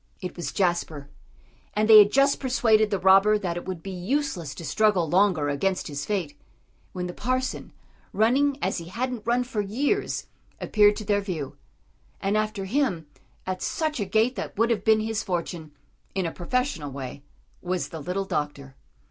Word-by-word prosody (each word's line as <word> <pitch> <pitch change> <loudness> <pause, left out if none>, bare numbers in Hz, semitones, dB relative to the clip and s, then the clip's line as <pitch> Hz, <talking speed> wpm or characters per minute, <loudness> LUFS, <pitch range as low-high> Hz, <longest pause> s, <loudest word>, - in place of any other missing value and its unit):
It 180 -2 -6
was 175 - -4
Jasper. 170 -6 -1 0.7
And 215 +1 +2
they 220 -1 +10
had 205 0 +6
just 275 +2 +3
persuaded 225 -5 +3
the 200 - 0
robber 195 +3 +5
that 180 -5 -3
it 175 - -5
would 185 -3 -6
be 195 - -6
useless 185 - -2
to 170 - -8
struggle 185 +2 +2
longer 180 -3 +3
against 185 +7 -1
his 145 0 -5
fate, 180 -9 -2 0.6
when 180 -1 -4
the 175 - -5
parson, 255 +5 -2 0.4
running 265 +7 +2
as - - 0
he 170 - -8
hadn't 235 +4 -4
run 245 +1 +2
for 240 -4 -2
years, 270 - -1 0.3
appeared 210 -1 +4
to 215 - -6
their 205 0 +2
view. 165 -9 -5 0.6
And 195 +2 0
after 215 -2 -1
him, 200 - 0 0.4
at 185 0 -3
such 310 -4 -2
a 205 - -1
gait 220 +6 +2
that - - -5
would 230 +2 +2
have 230 - 0
been 220 -1 +4
his 220 0 -2
fortune, 175 -5 -4 0.4
in 190 -2 0
a 165 - -2
professional 185 - -2
way, 135 0 -7 0.4
was 180 0 -2
the 165 - -7
little 180 +6 -3
doctor. 145 -5 -4
195 Hz, 175 wpm, -25 LUFS, 175-225 Hz, 0.7 s, they